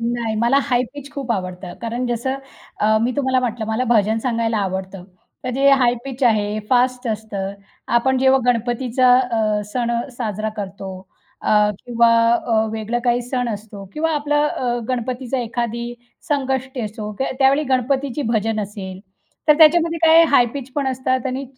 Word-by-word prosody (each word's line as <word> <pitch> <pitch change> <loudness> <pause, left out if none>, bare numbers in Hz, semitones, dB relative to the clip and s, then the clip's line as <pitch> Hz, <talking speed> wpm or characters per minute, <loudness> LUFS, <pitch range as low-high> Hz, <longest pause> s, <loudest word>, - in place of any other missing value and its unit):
नाही, 230 -1 -1
मला 240 +4 +4
हाई 245 -2 +1
पिच 285 0 -9
खूप 275 -4 -5
आवडतं, 185 -3 -5
कारण 235 +2 -3
जसं 240 +2 -1 0.5
अ, 215 +1 +3
मी 245 +2 +1
तुम्हाला 260 -2 +2
म्हटलं, 235 -2 -2
मला 220 +3 0
भजन 220 -2 +2
सांगायला 230 -1 -1
आवडतं. 190 -1 -4 0.4
तर 255 - -1
जे 275 +1 +3
हाई 255 -3 +4
पिच 270 0 -7
आहे 210 -2 +2
फास्ट 250 0 +2
असतं. 210 -3 -3 0.5
आपण 265 +2 +1
जेव्हा 265 +1 +4
गणपतीचा 245 +1 +2
अ, 220 -4 0
सण 240 -2 -1 0.2
साजरा 215 -3 -2
करतो, 195 -1 -6 0.5
अ, 210 -1 +3 0.2
किंवा 235 -1 +3 0.3
अ, 225 -2 +1
वेगळं 220 +2 -2
काही 245 0 +2
सण 245 0 -2
असतो 205 -2 -7
किंवा 325 +2 -1
आपलं 295 0 +1
अ, 245 -4 -1
गणपतीचं 255 +1 -2
एखादी 235 0 -3 0.3
संकष्टी 265 -2 -1
असो, 210 -1 -5
त्या 265 - -1
त्यावेळी 275 +2 +4
गणपतीची 265 +2 0
भजन 225 -2 0
असेल, 195 -2 -7 0.5
तर 300 - +8
त्याच्यामध्ये 330 +1 +5
काय 325 0 +7
हाई 245 -4 +5
पिच 270 -2 -6
पण 285 0 -1
असतात 260 -1 -1
आणि 260 +1 -3
240 Hz, 160 wpm, -20 LUFS, 220-265 Hz, 0.5 s, तर